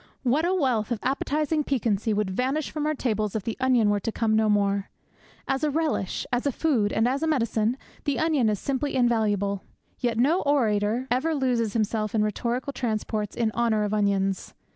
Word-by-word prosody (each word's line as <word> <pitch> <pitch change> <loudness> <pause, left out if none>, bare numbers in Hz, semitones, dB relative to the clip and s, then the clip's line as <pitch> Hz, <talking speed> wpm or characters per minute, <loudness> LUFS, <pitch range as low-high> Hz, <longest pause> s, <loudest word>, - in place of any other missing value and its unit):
What 275 +6 +2
a 360 - +1
wealth 250 - +1
of 240 - -1
appetizing 300 +3 0
piquancy 225 -6 0
would 210 -2 0
vanish 265 +8 -1
from 300 -1 -2
our 310 - 0
tables 215 -6 -1
if 215 - -1
the 225 - -3
onion 250 -5 +3
were 205 - +1
to 225 - -3
come 220 -1 +1
no 220 0 +3
more! 200 -1 +1 0.6
As 270 +2 -1
a 305 - +3
relish, 300 - -1
as 245 +3 +1
a - - +2
food, 245 -8 +1
and 225 +2 +2
as 270 +3 0
a 320 - 0
medicine, 230 -5 +1 0.3
the 285 -2 0
onion 305 -8 +2
is 210 - 0
simply 275 +5 -2
invaluable; 210 -5 +1 0.4
yet 235 -2 0
no 300 +10 +3
orator 230 -3 +1
ever 300 +6 +1
loses 245 -6 0
himself 215 -1 -1
in 215 - +3
rhetorical 240 +6 -2
transports 215 -4 -2
in 230 -2 0
honour 220 -2 +1
of 210 0 -2
onions! 195 -2 0
235 Hz, 190 wpm, -26 LUFS, 210-275 Hz, 0.6 s, onion